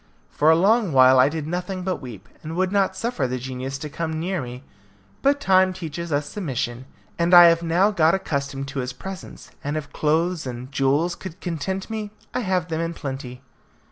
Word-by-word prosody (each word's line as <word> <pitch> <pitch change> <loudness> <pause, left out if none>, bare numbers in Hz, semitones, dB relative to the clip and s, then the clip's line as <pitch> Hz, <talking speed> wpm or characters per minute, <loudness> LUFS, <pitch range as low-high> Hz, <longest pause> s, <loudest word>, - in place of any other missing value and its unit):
For 150 - +3
a 160 - +7
long 200 +1 +3
while 130 0 +7
I 130 +2 +6
did 155 -1 -4
nothing 180 +3 -3
but 185 0 -1
weep, 115 -6 -9
and 160 +1 -6
would 185 +1 +1
not 195 -2 +1
suffer 190 - -1
the 130 +1 -2
genius 130 +1 -5
to 150 - -6
come 160 +1 -3
near 180 0 -2
me; 125 +1 -8 0.6
but 280 +1 +3
time 190 -6 +4
teaches 170 -1 -6
us 145 0 0
submission, 130 - -4 0.3
and 170 +1 +4
I 175 - +11
have 165 0 +2
now 175 +5 +2
got 165 -3 +3
accustomed 140 -6 -3
to 140 -1 -4
his 125 0 -3
presence, 190 +7 -9
and 145 +2 -2
if 150 -2 -6
clothes 160 +1 0
and 125 +2 -7
jewels 140 +6 +1
could 185 0 -9
content 190 +3 -3
me, 215 -2 -4 0.2
I - - 0
have 185 -6 -1
them 160 0 -1
in 165 0 -3
plenty. 135 -3 -6
160 Hz, 200 wpm, -23 LUFS, 135-185 Hz, 0.6 s, I